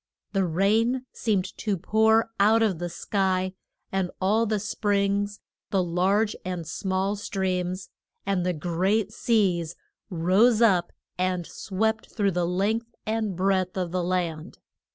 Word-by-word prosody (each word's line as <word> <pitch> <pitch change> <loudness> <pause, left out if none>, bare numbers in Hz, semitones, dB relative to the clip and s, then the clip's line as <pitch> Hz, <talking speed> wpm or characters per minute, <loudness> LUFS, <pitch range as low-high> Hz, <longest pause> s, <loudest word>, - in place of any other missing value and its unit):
The 195 -2 +2
rain 220 +9 +2
seemed 200 -5 -1
to 205 -3 -1
pour 220 +4 +3
out 220 +3 +5
of 195 -7 +1
the 175 0 -3
sky, 185 +1 -1 0.4
and 190 -2 0
all 215 +4 +2
the 215 -1 0
springs, 205 0 0 0.3
the 190 -2 +2
large 190 +5 +1
and 180 -2 -4
small 190 +4 -1
streams, 185 -2 -2 0.3
and 195 -2 0
the 180 - +1
great 185 +6 0
seas, 185 -9 +1 0.3
rose 195 +6 +3
up 190 -7 +3 0.3
and 180 -1 0
swept 220 +5 -2
through 200 -3 +1
the 175 -1 0
length 215 +6 -1
and 215 -3 -1
breadth 185 0 +1
of 180 -2 -2
the 180 0 -1
land. 175 -2 -2
195 Hz, 135 wpm, -26 LUFS, 180-215 Hz, 0.4 s, out